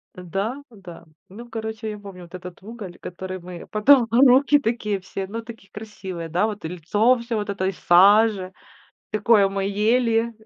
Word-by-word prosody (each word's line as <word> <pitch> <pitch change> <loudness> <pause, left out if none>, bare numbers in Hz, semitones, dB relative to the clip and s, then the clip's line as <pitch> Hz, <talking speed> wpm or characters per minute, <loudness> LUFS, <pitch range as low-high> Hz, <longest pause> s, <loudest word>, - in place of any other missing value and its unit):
Да-да. 195 - -6 0.2
Ну, 235 +5 -11
короче, 220 -1 -5
я 210 - -7
помню 195 -3 -11
вот 175 +1 -12
этот 180 0 -10
уголь, 205 -4 -9
который 185 +1 -7
мы 175 0 -10
потом 235 +3 +5
руки 270 +4 +5
такие 220 -5 -2
все 190 +1 -6
ну, 225 +4 -5
такие, 225 -3 -13
красивые, 190 -5 -7
да. 180 +6 +1
Вот 210 -6 -6
и - - -1
лицо 205 +9 +1
всё 235 -1 -3
вот 205 - -3
в - - -2
этой 190 -1 -1
саже. 195 +2 +4 0.6
Такое 210 -1 +3
мы 195 0 -3
ели. 225 +3 +1
210 Hz, 165 wpm, -23 LUFS, 185-230 Hz, 0.6 s, потом